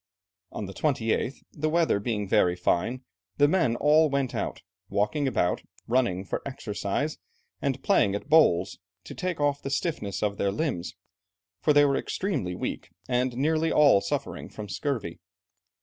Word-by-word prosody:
On 105 - -5
the 95 - -8
28th, 130 -1 -1
the 155 +1 -2
weather 165 -9 +2
being 105 -2 -2
very 90 -1 +3
fine, 90 +8 0 0.3
the 145 - +5
men 145 -8 +2
all 155 +4 +4
went 140 -3 -1
out, - - -3 0.3
walking 105 +8 0
about, 90 -9 +1 0.2
running 115 -7 +1
for - - -3
exercise, 130 +2 -3 0.4
and 135 -1 -2
playing 100 0 +3
at 105 - -5
bowls, 95 - +4 0.2
to - - -9
take 180 -3 -3
off 145 -1 +1
the 135 - -4
stiffness 135 - -2
of 100 -1 0
their 100 - +1
limbs, 100 - -3 0.6
for 150 - +2
they 145 0 +6
were 140 -1 +2
extremely 140 - -2
weak, - - -4 0.2
and 125 0 0
nearly 160 +3 +1
all 140 -9 +6
suffering 100 - -4
from 105 - -8
scurvy. 105 - -3
130 Hz, 155 wpm, -27 LUFS, 100-150 Hz, 0.6 s, they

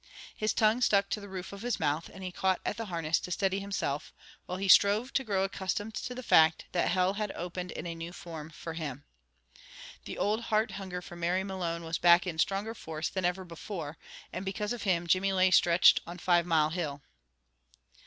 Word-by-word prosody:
His 215 0 0
tongue 220 +3 +3
stuck 200 -4 +3
to 210 - -1
the 200 - -10
roof 190 0 -6
of 200 - -8
his 245 +1 -1
mouth, 155 +1 -1
and 190 - -10
he 185 - -4
caught 190 +1 +1
at - - -1
the 225 -1 -5
harness 165 -3 0
to - - -7
steady 195 +1 0
himself, 190 -8 -3 0.4
while 180 - -3
he 195 +1 -2
strove 205 +6 +5
to 270 - +1
grow 200 -5 0
accustomed 195 +2 -3
to 250 - -5
the 255 - -6
fact 160 -6 +5
that 175 - +1
Hell 185 +1 +2
had 210 0 -3
opened 180 +1 -5
in - - -6
a 170 - -3
new 165 +1 -7
form 160 -3 -8
for 165 +1 -7
him. 145 -4 -5 1.0
The - - -6
old 215 +3 0
heart 215 +1 +1
hunger 185 -2 -6
for 175 - -10
Mary 175 +2 0
Malone 175 -4 -3
was 165 0 -3
back 175 +1 +6
in 170 -3 -4
stronger 205 +4 0
force 160 -7 -4
than 190 -2 -2
ever 180 +1 -1
before; 165 -2 -7 0.3
and 185 - -4
because 205 +3 -2
of 240 - -6
him 180 -4 +1
Jimmy 185 +3 +2
lay 185 0 +4
stretched 175 0 +6
on 175 +1 -7
Five 175 0 +2
Mile 155 -2 +3
Hill. 150 -5 -3
185 Hz, 210 wpm, -30 LUFS, 170-200 Hz, 1.0 s, back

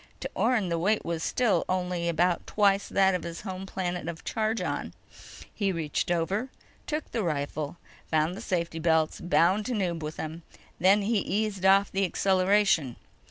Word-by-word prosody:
To - - -3
Orne, 220 -8 +1
the 170 -1 0
weight 210 +5 +1
was 170 -1 -2
still 240 +4 +1
only 180 -2 -1
about 170 +1 +1
twice 200 -1 +2
that 190 -1 +3
of 180 - -1
his 170 0 -6
home 190 -1 -6
planet 180 -3 -3
of 170 -1 -6
Chargon. 220 +1 -2 0.6
He 200 -2 0
reached 165 -3 -2
over, 190 +9 0 0.4
took 305 -1 -3
the 230 - -1
rifle, 150 -2 -3 0.3
found 160 +4 0
safety 170 -2 -2
belts, 160 -1 +1
bound 180 +4 +2
Tanub 185 -9 -1
with 155 +1 -5
them. 160 +2 -6 0.4
Then 195 +3 +4
he 215 +1 +2
eased 200 -2 -1
off 195 +1 +5
the 195 0 0
acceleration. 190 - +2
185 Hz, 160 wpm, -28 LUFS, 165-200 Hz, 0.6 s, off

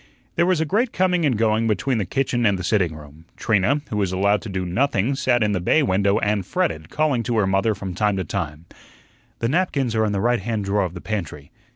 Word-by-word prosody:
There 170 +1 +2
was 185 -3 +2
a 160 - +1
great 225 - 0
coming 180 -3 +2
and 125 -6 0
going 110 0 +2
between 115 +3 0
the 100 - -2
kitchen 125 -3 0
and 100 -3 +3
the 90 - -5
sitting 90 -4 +1
room. 75 +1 -13
Trina, 115 +7 +1
who 105 - -2
was 100 -3 0
allowed 100 +2 +2
to 115 - -8
do 95 -1 -3
nothing, 120 +4 0
sat 130 -3 +1
in 105 - +1
the 95 -3 -1
bay 155 - +3
window 100 -2 +2
and 105 -2 0
fretted, 80 -3 -2
calling 150 -6 +1
to 115 0 -2
her 105 - +3
mother 95 +3 +1
from 95 -2 -6
time 105 +1 0
to 95 - -1
time: 80 -2 -5 0.8
"The 115 - +1
napkins 140 -6 0
are 110 -1 +2
in 105 - -1
the 100 - -1
right 120 +3 +2
hand 105 0 -3
drawer 100 0 +1
of 90 0 -6
the 85 - -7
pantry." 85 -9 -5
105 Hz, 240 wpm, -22 LUFS, 95-125 Hz, 0.8 s, and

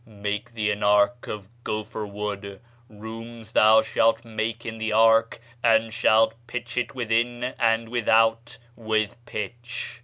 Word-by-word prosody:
Make 105 +2 -5
thee 105 -2 0
an 105 - -4
ark 105 +4 +3
of 105 -2 -6 0.2
gopher 110 0 -4
wood; 100 -1 -5 0.3
rooms 110 +1 -10
shalt 110 +1 +6 0.4
thou 115 - -15
make 110 +1 -3
in 115 -1 -6
the 110 0 -2
ark, 115 +1 +4 0.2
and 115 -1 +3
shalt 110 +1 +3
pitch 125 - -6
it 125 +1 -2
within 120 0 0 0.2
and 115 -1 +2
without 115 0 +2 0.2
with 110 -2 -1
pitch. 120 +2 -6
110 Hz, 135 wpm, -25 LUFS, 105-115 Hz, 0.4 s, shalt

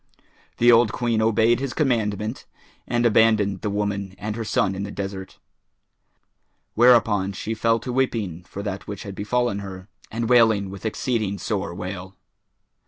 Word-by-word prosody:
The 120 +1 +6
old 115 -2 +5
Queen 115 -2 0
obeyed 115 +2 +3
his 135 -2 -4
commandment 110 -5 -1 0.4
and 120 0 0
abandoned 105 -4 +3
the 105 - -2
woman 100 -2 -2
and 105 +2 -4
her 115 - -3
son 100 -2 +1
in 95 - -5
the 100 - -4
desert; 95 -1 -6 1.4
whereupon 115 -5 +4
she 110 +3 -4
fell 115 +1 +2
to 125 - -5
weeping 110 -10 -1
for 100 +1 -7
that 100 -2 -5
which 100 -1 -6
had 100 - -7
befallen 105 +1 -1
her 95 0 -9 0.2
and 115 +1 -3
wailing 110 -5 +4
with 100 +3 -5
exceeding 110 -3 -1
sore 95 -2 -3
wail. 95 +1 -6
105 Hz, 155 wpm, -23 LUFS, 100-115 Hz, 1.4 s, The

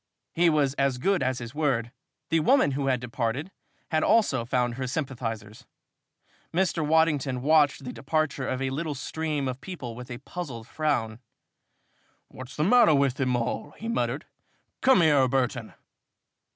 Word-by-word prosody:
He 170 +1 +4
was 145 -4 +2
as 135 -2 +2
good 195 +8 +1
as 130 -1 0
his 120 0 -7
word. 135 -6 0 0.4
The 165 - +4
woman 210 - +4
who 135 0 -2
had 130 -2 +2
departed 125 +7 -3 0.4
had 155 -1 +2
also 200 - +3
found 120 0 0
her 130 +1 -4
sympathizers. 115 -6 -5 0.8
Mr. 175 -2 +1
Waddington 150 -5 +2
watched 150 -2 +3
the 125 - -6
departure 145 -2 -1
of 130 +1 -2
a 135 - -1
little 150 +2 -3
stream 150 0 -3
of 130 0 -4
people 150 -11 -7
with 125 +2 -9
a 120 - -5
puzzled 125 -8 -7
frown. 120 -8 -1 1.1
"What's 130 +1 -10
the 150 - 0
matter 215 -3 +6
with 140 -2 +2
them 130 -2 +1
all?" 120 +4 -3
he 225 - -6
muttered. 230 - -1 0.6
"Come 260 -8 +5
here, 145 -5 +4
Burton." 125 -3 -1
135 Hz, 155 wpm, -26 LUFS, 125-160 Hz, 1.1 s, matter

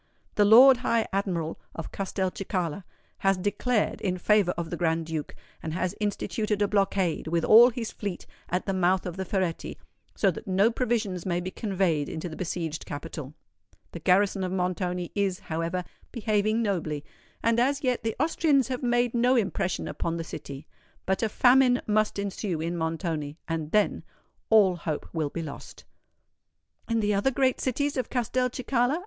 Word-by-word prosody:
The 205 - +4
Lord 250 +5 +9
High 230 -2 0
Admiral 175 -5 -2 0.2
of 165 - -6
Castelcicala 185 -2 -3 0.3
has 195 -1 +2
declared 205 +4 0
in 185 -2 -1
favour 205 0 +3
of 170 -1 -4
the - - -1
Grand 165 -1 0
Duke, 160 -2 -5 0.3
and 160 - -4
has 185 0 -1
instituted 210 0 -1
a 205 - +2
blockade, 195 -5 0
with 165 0 0
all 235 +3 +8
his 235 -2 -5
fleet, 200 -4 -5 0.2
at 180 +1 -1
the 195 - -1
mouth 185 0 +2
of 180 -2 -4
the 190 0 -4
Ferretti, 185 -3 -2 0.4
so 195 - +3
that 170 - -9
no 195 +4 +3
provisions 220 -7 -1
may 175 -2 -1
be 180 +1 -5
conveyed 185 -9 0
into 160 +2 -4
the 155 - -8
besieged 165 -3 -3
capital. 145 -1 -7 0.6
The 170 - -7
garrison 190 +3 +2
of 185 - -2
Montoni 180 -1 -2
is, 195 -3 0
however, 165 +3 -2 0.3
behaving 215 0 +1
nobly; 155 -8 -2 0.4
and 230 0 +3
as 275 +4 +1
yet 250 -2 +1
the 225 -1 -2
Austrians 290 -6 +2
have 255 -1 -3
made 240 -1 +1
no 245 +2 +3
impression 195 -5 -1
upon 170 0 -3
the 165 - -3
city. 140 -3 -8 0.4
But 190 0 0
a 225 - +1
famine 250 +2 +5
must 215 0 +1
ensue 200 -3 -3
in 165 +2 -2
Montoni;—and 160 -1 -3
then, 210 -1 +2 0.5
all 200 -5 +5
hope 155 -3 -4
will 155 -3 -1
be 165 +3 -5
lost!" 150 - -9 1.0
"And 230 -1 0
the 210 0 +2
other 200 +6 +2
great 260 -1 +1
cities 285 +3 -1
of 255 - -2
Castelcicala?" 250 +2 0
195 Hz, 165 wpm, -27 LUFS, 170-225 Hz, 1.0 s, Lord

